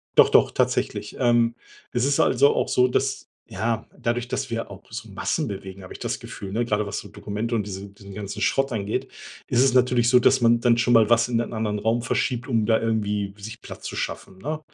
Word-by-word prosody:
Doch - - +7
doch, - - +5
tatsächlich. - - -1
Ähm, 120 -1 +3 0.4
es 120 +1 +1
ist 140 0 +1
also 140 +3 +4
auch - - 0
so, 125 0 +4
dass 125 - -1 0.2
ja, 110 +3 -2
dadurch, 120 +1 -1
dass - - -3
wir 115 0 -3
auch 100 -1 -11
so 115 0 -7
Massen 145 +9 -2
bewegen, 95 -2 -7
habe 90 - -10
ich - - -11
das - - -3
Gefühl, 95 - -8
ne? 115 +4 0
Gerade 105 -2 0
was 100 +1 -4
so - - -10
Dokumente 110 +3 -4
und 105 -3 0
diesen 100 0 -7
diesen 100 -1 -12
ganzen 100 0 -6
Schrott 135 -1 +1
angeht, 105 -1 -2 0.4
ist 125 +1 +3
es 135 -2 +3
natürlich 125 -2 +3
so, 125 0 +6
dass 130 +2 +4
man 120 0 +4
dann 115 0 +3
schon 120 +1 +2
mal 115 -2 +5
was 120 +1 +4
in 115 -2 +1
einen 120 - -3
anderen 110 -2 -1
Raum 115 +3 +1
verschiebt, 120 +1 -1
um 115 -4 +2
da 110 0 +4
irgendwie 105 -3 -1
sich 110 +3 -9
Platz - - -10
zu - - -5
schaffen, 95 - -5
ne? 155 +7 -3
115 Hz, 230 wpm, -24 LUFS, 105-120 Hz, 0.4 s, Doch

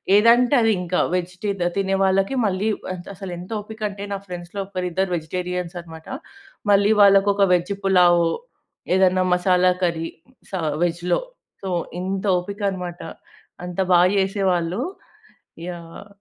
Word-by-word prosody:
ఏదంటే 235 +5 +5
అది 225 -1 +3
ఇంకా. 180 0 -1
వెజ్ 180 0 -1
టి 210 - 0 0.3
తినే 195 -1 +1
వాళ్ళకి 195 +5 +2
మళ్ళీ 195 +1 0
ఆహ్, - - -8
ఎంత్ 175 -1 -9
అసలెంత 180 -1 -7
ఓపిక 220 +1 -11
అంటే 200 0 -8
నా - - -2
ఫ్రెండ్స్‌లో 175 +1 -7
ఒకరిద్దరు 185 -1 -2
వెజిటేరియన్స్ 180 +2 -4
అన్నమాట. 160 -1 -12 0.6
మళ్ళీ 200 +1 +4
వాళ్ళకొక 200 0 +5
వెజ్ 180 +3 +1
పులావ్. 175 -3 +5 0.7
ఏదైనా 185 -1 +3
మసాలా 180 0 +3
కర్రీ 165 -2 0 0.4
స - - -22 0.3
వెజ్‌‌లో. 175 +1 0 0.4
సో, 190 - -3 0.3
ఇంత 190 +2 -3
ఓపిక 200 +4 -6
అన్నమాట. 180 -2 -6 0.6
అంత 180 -1 -7 0.2
బాగా 175 +1 +6
చేసేవాళ్ళు. 190 0 0 0.9
యాహ్! 170 +3 -9
185 Hz, 130 wpm, -22 LUFS, 175-195 Hz, 0.9 s, బాగా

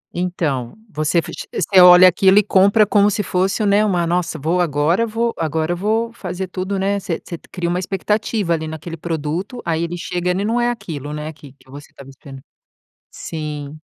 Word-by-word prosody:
Então, 160 -9 -2 0.2
você 155 +2 -1
f 165 - 0 0.2
você 190 -2 +3
olha 180 +1 +9
aquilo 190 +2 +4
e 210 - +6
compra 200 +2 +4
como 205 0 +3
se 210 +1 -1
fosse 190 +4 0
um, - - +1
né, 205 +1 +3 0.2
nossa 175 -1 -1
vou, 165 +5 0
agora 165 +7 +1
vou 230 +1 -1
agora 160 +1 -1
vou 220 +5 -1
fazer 185 -3 -5
tudo, 190 +2 -3
né. 200 +1 0
Você 180 -4 -4
você 170 - -6 0.2
cria 175 -2 -3
uma 175 +1 0
expectativa 195 0 -1
ali 160 -1 -3
naquele 160 +2 -7
produto, 165 - -4
aí 165 0 -1
ele 170 +1 -4
chega 175 +1 -3
ele 185 +3 0
não 235 +3 0
é 240 - +2
aquilo, 160 - -6
né, 150 +1 -5
que 145 -3 -15
que 135 - -26
você 145 +2 -11
está - - -14
me 135 - -13
esperando. 135 0 -13 0.7
Sim. 150 -2 -6
175 Hz, 195 wpm, -19 LUFS, 155-200 Hz, 0.7 s, olha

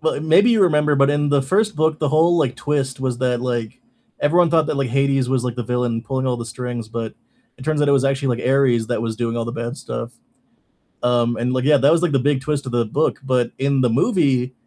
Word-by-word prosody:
Well, 160 0 0
i - - -4
maybe 165 +9 +4
you 220 -4 +3
remember, 150 -4 +2
but 140 0 +3
in 145 0 0
the 140 -1 +2
1st 210 +9 0
book, 155 0 +1
the 150 - 0
whole, 165 +4 +3
like, 135 -6 0
twist 135 -3 -2
was 130 -2 -2
that, 125 -2 0
like, 120 -3 -4 0.4
everyone 170 +3 +3
thought 160 -1 +2
that, 150 - -2
like, 140 -2 -1
Hades 135 0 +1
was, 130 -2 0
like, 125 -1 -3
the 120 - -3
villain 120 -1 -2
pulling 130 0 -3
all 125 -1 0
the 115 -1 -6
strings, 120 -1 -6
but 115 -1 -5 0.4
it 130 - -10
turns 155 -1 0
out 145 - +2
it 140 - +4
was 135 -1 +2
actually, 135 0 0
like, 125 - -3
Ares 130 -4 +2
that 120 -1 -2
was 115 -1 -3
doing 120 0 -2
all 115 - -2
the 115 - -5
bad 120 +4 -5
stuff, 115 +1 -6 0.9
um, 120 -1 +1
and, 125 +2 -1
like, 130 - -1
yeah, 145 +1 +4
that 140 +2 +3
was, 170 +1 +3
like, 175 -4 +1
the 135 - +2
big 140 +1 0
twist 145 -1 -3
of 125 - -5
the 120 -1 +1
book, 145 +9 -1
but 125 -2 0
in 135 0 0
the 125 - +2
movie, 135 - +1
135 Hz, 260 wpm, -20 LUFS, 120-150 Hz, 0.9 s, maybe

